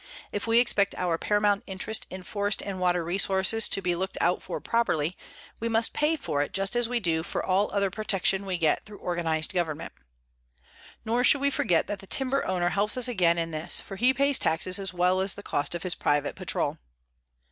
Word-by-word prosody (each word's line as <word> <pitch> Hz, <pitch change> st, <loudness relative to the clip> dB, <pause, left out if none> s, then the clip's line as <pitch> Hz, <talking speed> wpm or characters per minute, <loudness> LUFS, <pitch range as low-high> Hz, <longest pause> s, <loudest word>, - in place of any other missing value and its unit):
If 205 Hz, +2 st, -4 dB
we 230 Hz, 0 st, +3 dB
expect 210 Hz, -5 st, +2 dB
our 175 Hz, -2 st, -1 dB
paramount 205 Hz, -1 st, +1 dB
interest 195 Hz, +3 st, -2 dB
in 185 Hz, 0 st, -8 dB
forest 205 Hz, +2 st, -2 dB
and 195 Hz, -2 st, -5 dB
water 180 Hz, -1 st, +1 dB
resources 190 Hz, +5 st, +2 dB
to 195 Hz, -, +2 dB
be 180 Hz, -1 st, +1 dB
looked 185 Hz, +2 st, -3 dB
out 175 Hz, +2 st, +1 dB
for -, -, -5 dB
properly, 180 Hz, -8 st, 0 dB, 0.4 s
we 230 Hz, -, -2 dB
must 225 Hz, 0 st, +2 dB
pay 300 Hz, +2 st, +1 dB
for 145 Hz, -, -2 dB
it 145 Hz, -, -3 dB
just 195 Hz, +4 st, -1 dB
as 240 Hz, -1 st, +1 dB
we 245 Hz, -1 st, 0 dB
do 165 Hz, -6 st, 0 dB
for 165 Hz, -, -2 dB
all 195 Hz, +2 st, +1 dB
other 200 Hz, -1 st, 0 dB
protection 195 Hz, -1 st, 0 dB
we 185 Hz, -2 st, -1 dB
get 160 Hz, -3 st, +1 dB
through 210 Hz, -1 st, -12 dB
organized 165 Hz, -2 st, -1 dB
government. 165 Hz, -3 st, -3 dB, 1.1 s
Nor 235 Hz, +3 st, +1 dB
should 275 Hz, +2 st, +4 dB
we 280 Hz, 0 st, +2 dB
forget 175 Hz, -10 st, +1 dB
that 205 Hz, -, -5 dB
the 195 Hz, -, -12 dB
timber 270 Hz, +4 st, 0 dB
owner 180 Hz, -2 st, 0 dB
helps 205 Hz, +5 st, +1 dB
us 255 Hz, -, +5 dB
again 180 Hz, -8 st, +2 dB
in 165 Hz, 0 st, -2 dB
this, 155 Hz, +2 st, +1 dB
for 195 Hz, -, -9 dB
he 245 Hz, +6 st, +3 dB
pays 280 Hz, +1 st, +2 dB
taxes 180 Hz, +4 st, +1 dB
as 195 Hz, -2 st, -4 dB
well 180 Hz, +1 st, +1 dB
as 190 Hz, +1 st, +2 dB
the 205 Hz, -, -10 dB
cost 145 Hz, 0 st, -1 dB
of 170 Hz, -, -5 dB
his 185 Hz, -2 st, +2 dB
private 145 Hz, -2 st, 0 dB
patrol. -, -, -2 dB
190 Hz, 210 wpm, -27 LUFS, 175-220 Hz, 1.1 s, us